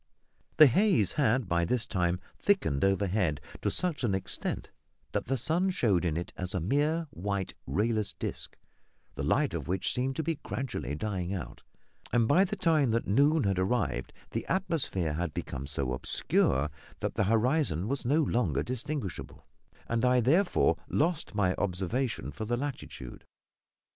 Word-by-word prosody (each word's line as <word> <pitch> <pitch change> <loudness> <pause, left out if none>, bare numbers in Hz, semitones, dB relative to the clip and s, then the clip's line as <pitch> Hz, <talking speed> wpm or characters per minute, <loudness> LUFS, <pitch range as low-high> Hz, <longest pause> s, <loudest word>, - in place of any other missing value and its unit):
The 155 - +10
haze 135 - +3
had 130 -5 +2
by 85 -1 +1
this 115 +7 0
time 90 -2 0 0.2
thickened 135 - +1
overhead 95 -5 +1 0.2
to - - +1
such 175 -7 -1
an 105 -5 +2
extent 95 - -3 0.4
that - - -2
the 135 - +1
sun 170 - +1
showed 105 - +2
in 80 -2 0
it 85 - -5
as 90 +1 -3
a - - +1
mere 145 - +1
white, 100 +1 -3
rayless 105 - 0
disc, - - -6 0.6
the - - -5
light - - +1
of - - -4
which 90 +1 0
seemed 130 +2 -1
to 160 - -1
be 160 -1 -2
gradually 120 - -4
dying 95 0 -2
out; 85 - -7 0.5
and 115 -2 +3
by 175 +9 +5
the - - -3
time 155 -6 +3
that 115 +1 +1
noon 145 +8 +3
had 95 -2 +1
arrived 100 +3 0 0.2
the - - -2
atmosphere 155 - 0
had 80 0 -3
become 70 +2 -4
so 70 -3 -2
obscure 70 +2 +1 0.3
that - - -2
the - - +1
horizon 115 - +2
was 140 +2 -1
no 150 +6 +3
longer 90 - +1
distinguishable, 130 - -4 0.4
and 115 0 0
I, 125 0 +4
therefore, 165 - +3
lost 160 -6 0
my 95 -3 +2
observation 105 +6 -1
for 110 - -5
the 120 +2 0
latitude. 130 - -6
110 Hz, 160 wpm, -30 LUFS, 90-140 Hz, 0.6 s, The